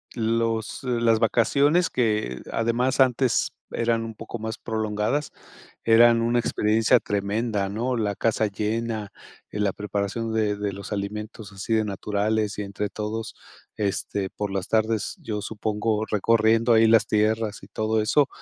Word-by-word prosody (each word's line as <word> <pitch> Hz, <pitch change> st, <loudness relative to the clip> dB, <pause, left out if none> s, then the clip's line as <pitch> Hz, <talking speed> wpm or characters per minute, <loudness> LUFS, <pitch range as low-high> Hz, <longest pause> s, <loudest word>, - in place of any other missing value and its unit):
los 115 Hz, 0 st, -1 dB
las 115 Hz, -3 st, +2 dB
vacaciones, 140 Hz, +9 st, +3 dB
que 105 Hz, -, 0 dB
además 120 Hz, +3 st, 0 dB
antes 130 Hz, -1 st, +2 dB, 0.2 s
eran 115 Hz, -1 st, 0 dB
un 115 Hz, -1 st, -7 dB
poco 120 Hz, -, -7 dB
más 110 Hz, +1 st, -4 dB
prolongadas, 110 Hz, +5 st, -2 dB, 0.5 s
eran 115 Hz, +1 st, +6 dB
una 120 Hz, +1 st, +2 dB
experiencia 110 Hz, -1 st, +3 dB
tremenda, 105 Hz, 0 st, -1 dB
¿no? 120 Hz, +5 st, -1 dB
La 105 Hz, -3 st, -1 dB
casa 110 Hz, -1 st, +1 dB
llena, 110 Hz, +1 st, -3 dB, 0.4 s
eh, 105 Hz, -, -4 dB
la 100 Hz, -2 st, +1 dB
preparación 105 Hz, +3 st, -3 dB
de 105 Hz, -2 st, +1 dB
de 100 Hz, -1 st, -2 dB
los 100 Hz, +1 st, -8 dB
alimentos 105 Hz, +1 st, -5 dB
así 100 Hz, +4 st, -5 dB
de 110 Hz, -1 st, +2 dB
naturales 105 Hz, +1 st, -1 dB
y -, -, -1 dB
entre 100 Hz, +1 st, -3 dB
todos, 110 Hz, +1 st, -4 dB, 0.4 s
este, 100 Hz, -1 st, -2 dB
por 105 Hz, -1 st, -4 dB
las 95 Hz, -1 st, -2 dB
tardes, 110 Hz, -1 st, 0 dB
yo 105 Hz, -2 st, -4 dB
supongo, 110 Hz, 0 st, -1 dB
recorriendo 115 Hz, +2 st, +3 dB
ahí 115 Hz, 0 st, +6 dB
las 115 Hz, 0 st, +5 dB
tierras 110 Hz, 0 st, 0 dB
y 95 Hz, -, -13 dB
todo 110 Hz, +1 st, 0 dB
eso, 140 Hz, +7 st, +3 dB
110 Hz, 145 wpm, -25 LUFS, 105-115 Hz, 0.5 s, eran